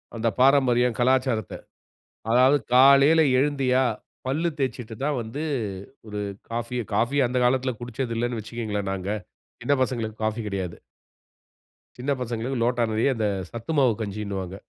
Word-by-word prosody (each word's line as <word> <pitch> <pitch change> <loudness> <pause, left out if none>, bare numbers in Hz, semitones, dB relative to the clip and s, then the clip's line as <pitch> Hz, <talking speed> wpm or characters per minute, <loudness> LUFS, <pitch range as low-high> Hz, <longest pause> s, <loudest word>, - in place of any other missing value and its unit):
அந்த 115 0 -1
பாரம்பரியம், 125 -3 +4
கலாச்சாரத்த. 130 -3 +1 0.8
அதாவது 130 +4 +5 0.2
காலையில 140 +5 +7 0.2
எழுந்தியா, 135 -2 +2 0.4
பல்லு 155 +6 0
தேச்சுட்டு 125 -4 -3
தான் 145 -3 0
வந்து 115 +7 -6 0.6
ஒரு 105 -1 -5 0.3
காஃபிய 120 +1 -3
காஃபி 135 +5 +1
அந்த 125 +1 -1
காலத்தில 130 +1 +2
குடிச்சது 120 0 -4
இல்லன்னு 120 -1 -1
வச்சுக்கோங்களேன் 105 -3 -4
நாங்க. 95 0 -4 0.5
சின்ன 145 - 0
பசங்களுக்கு 115 -4 -3
காஃபி 110 +1 -1
கெடையாது. 95 -4 -4 1.2
சின்ன 130 +3 -2
பசங்களுக்கு 120 +1 -3
லோட்டா 120 0 +1
நெறைய 110 +5 +2
அந்த 110 -2 0 0.2
சத்து 115 +6 -5
மாவு 130 -4 +4
கஞ்சின்னு 100 -1 -4
வாங்க. 95 0 -7
120 Hz, 130 wpm, -25 LUFS, 110-130 Hz, 1.2 s, காலையில